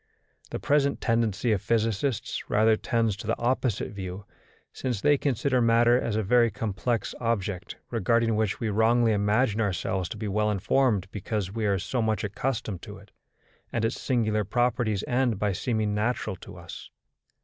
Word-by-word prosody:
The - - -3
present 140 -1 +2
tendency 115 -1 +1
of 100 -4 +1
physicists 115 +2 -1
rather 110 +1 +4
tends 115 -2 0
to 100 - -8
the 115 - 0
opposite 120 -2 0
view; 95 -1 -6 0.5
since 125 -6 -2
they 145 +8 +4
consider 135 -2 +1
matter 120 +1 +4
as 110 - -2
a 110 - +1
very 120 +3 +4
complex 115 +2 -2
object, 105 -6 -2 0.2
regarding 115 0 +2
which 110 -2 0
we 115 - -1
wrongly 115 +2 +3
imagine 105 +2 +2
ourselves 95 -2 -1
to - - -6
be 105 0 -4
well 105 +2 +1
informed 105 0 +1
because 100 -1 -3
we 110 -2 -1
are 100 -1 +2
so 120 +7 -2
much 110 -1 0
accustomed 105 -2 -3
to 105 0 -9
it, 100 0 -17 0.6
and 115 -1 0
its 115 - -2
singular 110 -4 +1
properties 115 -1 0
end 125 -3 +1
by 105 0 0
seeming 110 0 -1
natural 110 -1 -1
to - - -12
us. - - -10
110 Hz, 165 wpm, -27 LUFS, 105-120 Hz, 0.6 s, rather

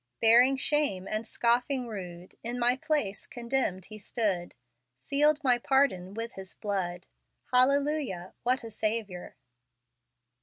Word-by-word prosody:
" - - -54
Bearing 245 +4 +6
shame 280 -10 +1
and 215 +1 -3
scoffing 245 +3 +1
rude, 180 -4 -8
In 240 +2 -2
my 245 +1 +3
place 260 -8 -1
condemned 235 -7 -2
He 215 0 -10
stood; 200 -5 -2 0.4
Sealed 295 - +2
my 250 -3 +3
pardon 220 -9 +1
with 230 +1 -4
His 190 -1 -7
blood: 185 -4 -3 0.5
Hallelujah, 265 - +2
what 255 +1 +1
a 225 - -8
Saviour!" 210 -5 -3
230 Hz, 125 wpm, -29 LUFS, 190-265 Hz, 0.5 s, Bearing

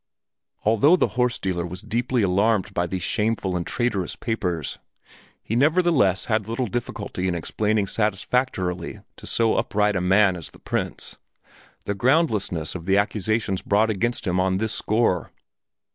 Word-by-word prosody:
Although 115 - +5
the 185 - +1
horse 125 -1 0
dealer 90 -2 -2
was 90 +2 -7
deeply 120 +2 0
alarmed 100 +2 +2
by 85 0 0
these 90 0 -4
shameful 105 -3 0
and 85 -1 -2
traitorous 120 -6 -1
papers, 90 - -3 0.6
he 110 - -3
nevertheless 145 - +3
had 110 -2 -1
little 115 +3 -1
difficulty 105 -4 -4
in 90 - 0
explaining 105 +5 0
satisfactorily 95 -3 -1 0.2
to - - -10
so 115 -1 +2
upright 105 0 +1
a 90 - 0
man 95 +1 +4
as 85 -3 -7
the - - -17
Prince - - -4 0.7
the 100 - -1
groundlessness 110 - +1
of 90 -1 -7
the 95 +1 +4
accusations 105 -1 0
brought 110 +2 +2
against 120 +3 -1
him 90 -1 0
on 95 0 +1
this 110 +2 -1
score. 110 -6 0
105 Hz, 150 wpm, -24 LUFS, 95-115 Hz, 0.7 s, Although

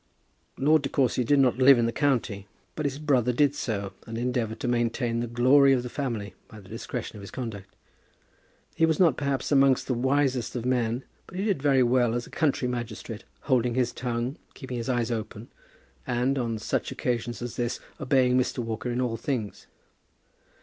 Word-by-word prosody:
Lord 150 +2 +4
De 135 - -3
Courcy 130 -2 +1
did 145 +5 +3
not 130 -2 +3
live 135 0 +8
in 120 - +2
the 115 - 0
county, 115 -7 0 0.3
but 155 -2 -1
his 135 0 -4
brother 135 -5 +2
did 140 +2 +3
so, 100 -8 -3
and 115 0 -5
endeavoured 120 -2 -2
to - - -2
maintain 120 0 0
the 120 - -2
glory 130 +4 +5
of 125 -2 +1
the 125 - -6
family 115 -9 -3
by 110 - -12
the 95 - -15
discretion - - -6
of - - -9
his 100 - -9
conduct. 100 -6 -7 1.0
He - - -1
was 160 -2 +1
not, 165 -8 +5
perhaps, 140 -2 -2
among 135 -2 +6
the 130 - -1
wisest 130 0 0
of 120 -1 -3
men, 125 -1 0 0.2
but 185 - -9
he 195 - -1
did 195 -10 0
very 135 -2 +4
well 120 -1 +2
as 120 -1 -2
a - - -15
country 140 -5 +1
magistrate, 120 -2 -5 0.2
holding 120 -2 +1
his 125 -2 +1
tongue, 120 +3 -3 0.2
keeping 130 -3 -6
his 120 +2 -4
eyes 120 -2 0
open, 110 0 -5 0.6
and, 125 +2 +1
on 115 -2 -1
such 105 - -2
occasions 120 -1 -2
as 120 - -5
this, 120 -1 -2 0.2
obeying 130 -3 +3
Mr. 130 +1 +1
Walker 115 0 -3
in 120 +1 -1
all 120 -2 -1
things. 115 -4 -4
125 Hz, 190 wpm, -27 LUFS, 115-135 Hz, 1.0 s, live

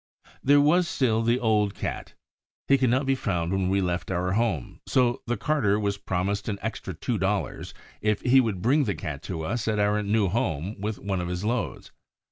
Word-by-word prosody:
There 145 +2 +6
was 170 +5 +4
still 115 -7 +1
the 120 +2 +2
old 105 -4 +1
Cat. - - -5 0.5
He 140 0 +4
could 130 -1 +3
not 130 +3 +2
be 135 - +2
found 90 -9 -1
when 95 -1 0
we 100 +1 +2
left 90 -1 -2
our 90 0 -1
home, 100 - -1
so 125 0 +2
the 120 0 0
carter 110 -5 +1
was 100 -1 -1
promised 100 +4 -2
an 100 - -2
extra 100 -4 -4
two 110 +6 -2
dollars 95 +2 -2 0.3
if 105 -1 +1
he 130 +1 +5
would 100 -7 -2
bring 140 +4 +3
the 100 - -1
Cat 75 -2 -5
to 80 -4 -3
us 110 +7 -2
at 110 -1 +1
our 105 +1 +2
new 105 0 +1
home 95 - -2
with 105 +1 -2
one 95 -2 -2
of 90 - -3
his 90 +2 -3
loads. 115 0 -2
105 Hz, 205 wpm, -26 LUFS, 95-120 Hz, 0.5 s, There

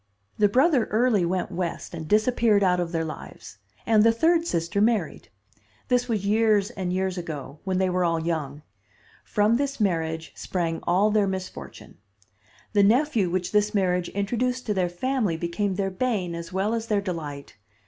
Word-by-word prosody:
The 205 -1 +5
brother 265 - +3
early 220 -4 +2
went 180 +2 -2
West 175 -1 -4
and 160 -2 -6
disappeared 215 0 +3
out 180 -1 +3
of 175 -1 -2
their 165 -2 -1
lives, 155 - -9 0.3
and 220 -2 +4
the 230 +1 +6
third 330 +8 +2
sister 170 - -1
married. 215 -7 0 0.6
This 245 -1 +2
was 210 -4 -1
years 210 -1 +2
and 185 -3 -4
years 185 0 -1
ago, 150 -4 -7
when 190 -1 0
they 190 0 +2
were 180 0 0
all 165 -1 +1
young. 155 -3 -3 0.6
From 215 +3 +2
this 275 0 -2
marriage 165 -5 -1
sprang 165 -3 -3
all 195 +5 +3
their 210 -2 +2
misfortune. 185 - -7 0.7
The 205 - +4
nephew 225 - +3
which 180 0 -2
this 210 +1 +1
marriage 180 -2 +1
introduced 245 +5 -2
to 210 - 0
their 185 -3 0
family 210 -1 -1
became 185 +4 -2
their 195 0 -1
bane 190 -5 -1
as 170 +1 -7
well 195 +4 0
as 230 -1 -3
their 205 -2 +1
delight. 150 - -6
195 Hz, 170 wpm, -25 LUFS, 170-220 Hz, 0.7 s, the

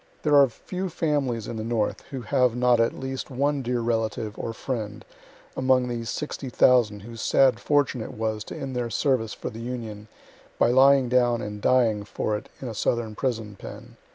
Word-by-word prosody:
There 150 -1 +3
are 140 -2 +7
few 185 +10 -5
families 140 -9 -1
in 115 - -5
the 110 - -3
North 115 -2 -1
who 130 -3 -6
have 125 0 +2
not 125 -1 +3
at 115 - +1
least 130 0 -5
one 140 +2 0
dear 125 -1 -1
relative 110 -2 -1
or 115 - -4
friend 110 -3 -5 0.5
among 130 -1 +2
these 115 -1 -4
60,000 125 -6 +2
whose 115 +2 -9
sad 135 -2 +4
fortune 145 -4 +1
it - - -7
was 110 -1 -2
to - - -7
end 135 -1 -5
their 120 -1 -1
service 120 -3 0
for - - -5
the 115 - -8
Union 115 -4 -6 0.5
by 120 - +4
lying 135 0 +6
down 120 -1 +2
and 105 0 -6
dying 115 -5 +3
for 105 +1 -2
it 105 - -7
in 130 - -6
a 115 - -4
southern 110 +1 -1
prison 110 -3 -3
pen. - - -10
120 Hz, 185 wpm, -25 LUFS, 110-130 Hz, 0.5 s, are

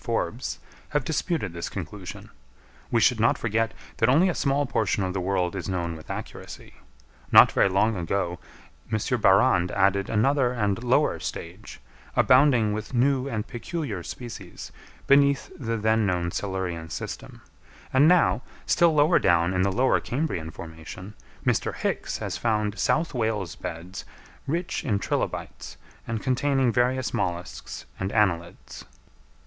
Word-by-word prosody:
Forbes, - - -2 0.3
have 145 -2 0
disputed 160 - -2
this 85 0 -5
conclusion. - - -8 0.6
We 115 - +2
should 115 +1 +3
not 115 - +3
forget 115 0 0 0.3
that 110 - +3
only 165 +9 +5
a - - 0
small 140 -1 +1
portion 105 -5 0
of 90 -1 -2
the 95 - -2
world 90 0 0
is 95 0 -4
known 85 -3 -2
with 80 - -13
accuracy. - - -8 0.6
Not - - +8
very - - +3
long 105 +4 +2
ago 90 0 -2 0.5
M. 110 - +2 0.2
Barrande 95 -2 +4
added 100 0 +2
another 125 +3 +2
and 105 -1 -1
lower 130 +5 +2
stage, 90 +6 -7 0.4
abounding 125 -5 +4
with 110 +4 -5
new 130 +2 +2
and 110 -4 -3
peculiar 120 - -5
species, 105 -3 -8 0.3
beneath 140 -1 +3
the 115 -3 -3
then 110 0 +2
known 90 -2 -1
Silurian 90 -5 -3
system; - - -7 0.5
and 135 +3 +6
now, 155 - +4 0.2
still 170 -2 +3
lower 150 +4 +5
down 85 0 +3
in 90 - +1
the 100 +1 +2
Lower 125 +6 +2
Cambrian 125 - -3
formation, 80 +5 -9 0.3
Mr - - 0
Hicks - - -2
has - - -4
found 105 -3 -1
South 160 +9 +1
Wales 110 - -1
beds 85 +5 -7 0.4
rich 170 +5 -2
in 105 -6 +1
trilobites, 100 - -4 0.3
and 115 -2 -3
containing 135 -1 +2
various 125 +1 +1
molluscs 90 0 -4
and 95 +1 -2
annelids. 85 -6 -1
110 Hz, 145 wpm, -25 LUFS, 95-130 Hz, 0.6 s, Not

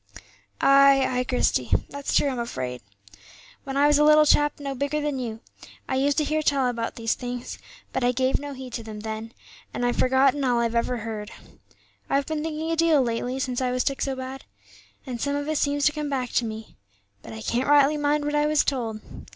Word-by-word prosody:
"Ay, 275 -1 +6
ay, 250 0 0
Christie, 250 0 0 0.2
that's 280 0 -3
true, - - +4
I'm 260 -3 -2
afraid. 125 - -4 0.8
When 270 0 -4
I 285 - +4
was 295 0 +4
a - - +5
little 305 0 +6
chap 295 0 +3
no 280 -1 -4
bigger 285 +3 -2
than 295 -2 -2
you, 225 -3 -5 0.5
I - - -3
used 280 +2 +1
to 310 - +3
hear 310 +1 0
tell 280 -3 +1
about 235 -2 -3
these 225 -1 0
things, 245 0 -6 0.3
but - - -1
I 245 - +3
gave 260 +1 +1
no 285 0 -6
heed 260 -2 -9
to 230 - -4
them 215 -1 -8
then, 220 +1 -6 0.4
and 245 - -1
I've 245 - 0
forgotten 265 +2 +3
all 245 -2 +2
I 235 - +2
ever 235 +2 0
heard. 215 -1 -6 0.8
I've 275 0 +1
been 310 0 -3
thinking 320 +1 -3
a - - +1
deal 325 -4 +4
lately 245 +2 -2
since 260 -2 -2
I 255 - 0
was 250 0 0
took 275 - -2
so 270 -1 -1
bad, 260 +1 -7 0.6
and 245 -4 -5
some 285 0 0
of 285 0 -3
it 310 -1 0
seems 285 0 +1
to 300 - +5
come 300 -1 -4
back 255 -3 -2
to 240 - +1
me. 220 0 -8 0.4
But 115 - -10
I 110 - -8
can't 250 +4 -1
rightly 290 0 +5
mind 295 0 +1
what 295 - -2
I 295 0 +2
was 300 -1 +3
told. 230 -6 -2
265 Hz, 220 wpm, -25 LUFS, 240-290 Hz, 0.8 s, Ay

